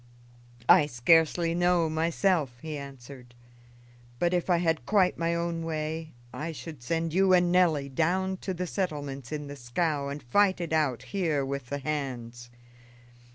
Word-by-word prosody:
"I 145 - +7
scarcely 165 +6 +3
know, 175 -1 +2
myself," 160 -3 0
he 155 -1 -4
answered; 135 -3 -10 0.8
"but, 175 +6 +1
if 175 +1 0
I 175 - +4
had 160 -6 0
quite 195 -3 +3
my 170 0 0
own 170 -1 -2
way, 160 -1 -4 0.2
I 165 +2 -4
should 145 0 -9
send 165 +5 -2
you 190 +1 +4
and 175 -1 +4
Nelly 165 -6 +3
down 185 +7 0
to 190 - -5
the 180 +1 -3
settlements 145 - -4
in 150 -1 -4
the 145 0 -8
scow 140 +3 -1
and 140 0 -6
fight 190 +10 +3
it 170 -2 -3
out 135 -6 +1
here 160 -8 0
with 140 -1 -4
the 140 - -3
hands." 125 -5 -5
155 Hz, 155 wpm, -28 LUFS, 140-175 Hz, 0.8 s, I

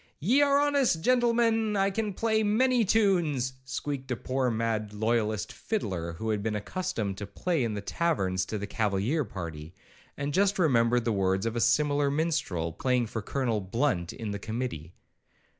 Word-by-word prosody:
'Ye 245 - +3
are 280 -1 +4
honest 280 - +2
gentlemen, 230 -3 +2
I 195 0 +2
can 210 -1 -2
play 220 -1 +1
many 240 +3 +3
tunes,' 175 - +2
squeaked 135 +1 -4
a 125 - 0
poor 130 +1 -1
mad 110 -2 -1
loyalist 110 -1 0
fiddler, 90 - -3
who 110 +7 -4
had 105 -1 -1
been 110 0 -2
accustomed 105 - -3
to 105 - -5
play 165 - -1
in 110 -3 -2
the 100 - -4
taverns 100 - 0
to 110 - -3
the 100 - -4
cavalier 105 +8 0
party, 85 - -7 0.4
and 140 0 -3
just 200 +3 +2
remembered 120 -8 +3
the 115 - +1
words 95 0 +1
of 115 0 -2
a 120 - 0
similar 145 +4 +3
minstrel 140 - -1
playing 125 +5 +1
for 110 0 -4
Colonel 115 -1 -1
Blunt 95 -3 -1
in 110 -2 -5
the 100 - -4
committee. 110 - -5
125 Hz, 170 wpm, -28 LUFS, -, 0.4 s, are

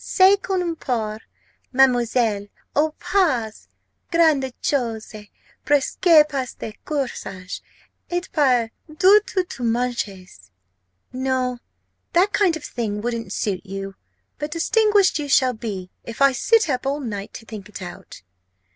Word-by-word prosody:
Ce 380 +1 +5
qu'on 360 -4 -1
porte, 220 -7 -3 0.5
Mademoiselle? 240 -5 +2 0.3
O 305 +1 +2
pas 255 - 0 0.4
grand'chose! 265 -8 +1 0.5
presque 300 +3 +4
pas 275 -4 -2
de 220 - -6
corsage, 235 -10 -4 0.5
et 350 0 0
pas 250 -7 +3 0.2
du 375 +7 +5
tout 370 - 0
de 250 - -7
manches!' 215 - -3 0.6
No, 255 -1 -1 0.5
that 375 +4 +3
kind 365 -5 +3
of 305 - -14
thing 215 -4 -3
wouldn't 230 +1 -3
suit 195 -4 -2
you. 195 0 -6 0.5
But 295 0 -3
distinguished 400 +2 +3
you 290 -1 -4
shall 260 -2 +4
be, 205 -5 -6
if 230 - -8
I 275 0 +6
sit 440 - +3
up 265 -2 -1
all 280 +2 0
night 205 -7 -5
to 225 - -9
think 210 -3 -9
it 195 - -8
out!" 175 - -10
255 Hz, 130 wpm, -22 LUFS, 220-310 Hz, 0.6 s, I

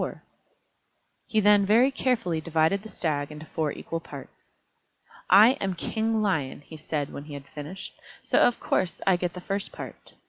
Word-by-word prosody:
He 220 - +1
then 205 0 +6
very 230 +7 +4
carefully 230 -12 0
divided 165 +4 +1
the 220 - -11
Stag 145 -5 -2
into 150 +1 -9
four 155 -2 -2
equal 165 - -5
parts. 140 -4 -12 0.8
"I 205 +5 +9
am 190 -2 -1
King 220 +4 -1
Lion," 155 -10 -1
he 150 +2 -12
said, 150 -2 -3
when 140 - -7
he 150 -1 -8
had 140 -1 -9
finished, 155 +8 -8 0.3
"so - - +2
of 245 - +4
course 180 - -1
I 190 - +5
get 175 0 -2
the 180 - -8
first 195 +2 -3
part. - - -10
175 Hz, 170 wpm, -26 LUFS, 155-205 Hz, 0.8 s, I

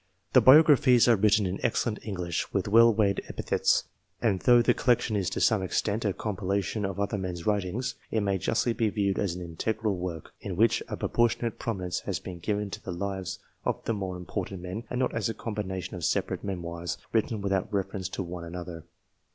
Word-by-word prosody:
The - - +7
biographies 130 -4 +7
are 120 - +6
written 105 0 +3
in 95 +1 -3
excellent 110 -3 0
English, 90 -5 -3
with 100 -1 -1
well 115 +3 +7
weighed 105 -2 +1
epithets; - - +1 0.4
and 100 -5 +1
though 120 +1 +5
the - - +4
collection 120 -3 +1
is, 95 -3 0
to - - -3
some 110 -3 +3
extent, 105 +4 -1
a 100 - +2
compilation 100 0 -2
of 95 0 -4
other 100 0 -1
men's 90 -3 -5
writings, 105 +5 -1 0.2
it 110 - 0
may 100 -2 0
justly 120 +6 +1
be 115 -2 +1
viewed 100 -2 0
as 95 -4 -1
an 90 - -6
integral 105 +5 -2
work, 90 -3 -6
in 95 -3 -4
which 115 +5 +3
a - - -5
proportionate 120 0 0
prominence 95 -6 -2
has - - -3
been 90 -2 -8
given 105 +2 -2
to - - -6
the 95 - -6
lives 95 +1 -4 0.3
of - - -2
the 115 - 0
more 95 -3 -4
im 90 - -9
portant 95 -2 -4
men, 95 +6 -5
and 125 - -2
not 130 - 0
as 115 -2 -1
a 115 - -3
combination 100 -5 -4
of 90 - -7
separate - - 0
memoirs, 85 -3 -4 0.2
written 110 -1 +1
without 100 0 -1
reference 95 -2 -2
to 95 - -4
one 85 0 -7
another. 85 -1 -7
100 Hz, 200 wpm, -28 LUFS, 90-110 Hz, 0.4 s, The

